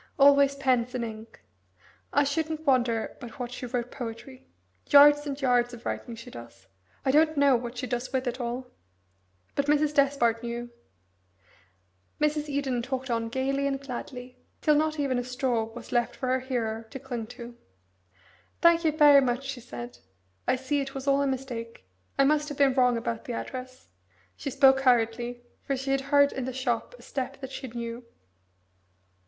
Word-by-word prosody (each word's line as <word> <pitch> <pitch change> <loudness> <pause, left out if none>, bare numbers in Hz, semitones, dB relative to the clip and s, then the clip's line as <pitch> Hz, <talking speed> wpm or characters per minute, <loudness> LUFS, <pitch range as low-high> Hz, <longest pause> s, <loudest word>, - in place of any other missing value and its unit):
Always 280 0 +6
pens 255 -3 +1
and 240 -2 -1
ink. 220 0 -10 0.7
I - - +4
shouldn't 315 +2 -2
wonder 240 -5 +1
but 240 -4 -10
what 245 -1 -5
she 250 0 -6
wrote 245 0 -3
poetry. 245 +2 -8 0.4
Yards 290 +1 +7
and 280 0 -4
yards 245 -2 +2
of 235 - -15
writing 235 - -4
she 230 - -11
does. 120 -2 -12 0.4
I 265 - +3
don't 310 +2 +4
know 280 -2 +5
what 240 +1 -4
she 255 - -3
does 250 0 -3
with 260 0 -1
it 245 +1 -3
all." 245 +2 -3 0.9
But 280 0 -1
Mrs. 295 0 +3
Despard 275 -5 +2
knew. 240 0 -5 1.5
Mrs. 300 0 0
Eden 275 -4 -1
talked 260 +1 -4
on 230 -1 -1
gaily 275 +3 0
and 275 -1 -1
gladly 250 -1 -8 0.2
till 305 - +3
not 310 +1 +1
even 265 -3 +1
a - - -2
straw 250 -2 -1
was 225 +1 -11
left 240 -1 +1
for 255 - -3
her 260 0 +2
hearer 230 -4 -3
to 270 - -7
cling 245 -4 -5
to. 235 0 -9 1.0
"Thank 340 0 +5
you 315 - +3
very 295 -2 +7
much," 250 0 0
she 270 -2 -5
said. 120 - -8 0.5
"I - - +3
see 265 +3 -1
it 270 0 -6
was 270 0 -5
all 275 0 +4
a 280 - +1
mistake. 245 - -5 0.3
I 275 - +5
must 300 +2 +2
have 290 - -6
been 275 -2 +4
wrong 250 -2 +3
about 230 0 -4
the 245 - -4
address." 255 +1 -7 0.5
She - - -5
spoke 270 0 +5
hurriedly 240 -1 +1 0.2
for 275 - -2
she 270 +1 -3
had 270 0 +2
heard 285 +1 +4
in 265 - -4
the 260 - -4
shop 245 - -2
a - - -16
step 270 0 -4
that 265 0 -6
she 265 0 -6
knew. 235 0 -6
260 Hz, 180 wpm, -27 LUFS, 240-280 Hz, 1.5 s, Yards